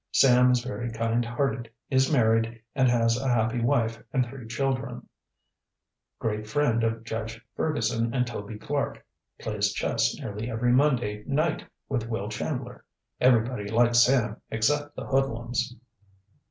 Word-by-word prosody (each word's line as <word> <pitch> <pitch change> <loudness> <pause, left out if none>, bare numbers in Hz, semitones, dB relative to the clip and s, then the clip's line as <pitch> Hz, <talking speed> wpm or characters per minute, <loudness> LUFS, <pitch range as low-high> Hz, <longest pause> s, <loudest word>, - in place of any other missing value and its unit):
Sam 125 -1 +6
is 125 -1 +2
very 120 -1 -4
kind 115 +1 0
hearted; 120 0 -2 0.2
is 130 +1 +3
married 115 -3 +2
and 130 -3 +3
has 115 0 +2
a 135 - -2
happy 120 0 +1
wife 115 -1 +1
and 130 -1 +2
three 120 -1 -9
children. 130 +2 -2 1.1
Great 105 -1 -3
friend 115 -1 +1
of 115 0 -1
Judge 115 0 -5 0.2
Ferguson 115 -7 0
and 125 0 +1
Toby 105 -2 -6
Clark. 140 +6 -3 0.3
Plays - - -1
chess - - 0
nearly 105 +3 -5
every 120 +1 +1
Monday 120 -6 +2
night 155 +3 0 0.2
with 120 -4 -2
Will 105 -3 -3
Chandler. 125 +2 -4 0.4
Everybody 120 -3 +3
likes 120 +2 +4
Sam 120 -4 +3
except 145 +7 0
the - - -6
hoodlums. 120 -2 -1
120 Hz, 140 wpm, -27 LUFS, 115-130 Hz, 1.1 s, Sam